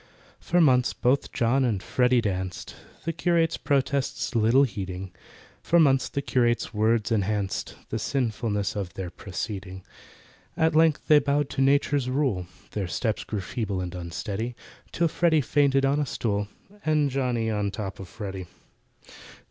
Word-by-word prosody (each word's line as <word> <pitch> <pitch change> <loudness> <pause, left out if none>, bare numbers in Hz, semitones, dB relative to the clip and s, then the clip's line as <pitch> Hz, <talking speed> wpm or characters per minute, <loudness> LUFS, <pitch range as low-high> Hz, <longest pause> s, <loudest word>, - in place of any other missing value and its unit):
For 175 - +1
months 125 -6 +4
both 130 +3 +1
JOHN 125 +3 +2
and 110 -7 0
FREDDY 125 0 +2
danced, 95 -4 -4 0.3
The 165 - -1
curate's 165 -1 +1
protests 140 -1 0
little 115 +4 +4
heeding; 95 -6 -4 0.5
For 170 - +3
months 135 -4 +4
the 140 - -3
curate's 120 -3 +1
words 110 +1 +1
enhanced 100 -2 -1
The 110 - -2
sinfulness 110 -5 -1
of 95 -4 -4
their 90 -2 -5
proceeding. 95 0 -6 0.7
At 160 0 +3
length 160 -1 +4
they 150 -1 +7
bowed 145 0 0
to 135 - -1
Nature's 140 -1 +2
rule— 130 -10 0 0.2
Their 100 -3 -2
steps 110 +4 -1
grew 105 -3 -4
feeble 100 -1 -3
and 90 -1 -4
unsteady, 100 +7 -4 0.4
Till 170 - +1
FREDDY 160 -1 +2
fainted 135 -1 +2
on 140 +2 +2
a 145 - 0
stool, 105 -4 -1 0.4
And 150 -3 +2
JOHNNY 125 -4 0
on 105 -1 -1
the 100 - -1
top 100 -1 -5
of 95 - -7
FREDDY. 95 -3 -6
120 Hz, 150 wpm, -26 LUFS, 100-140 Hz, 0.7 s, they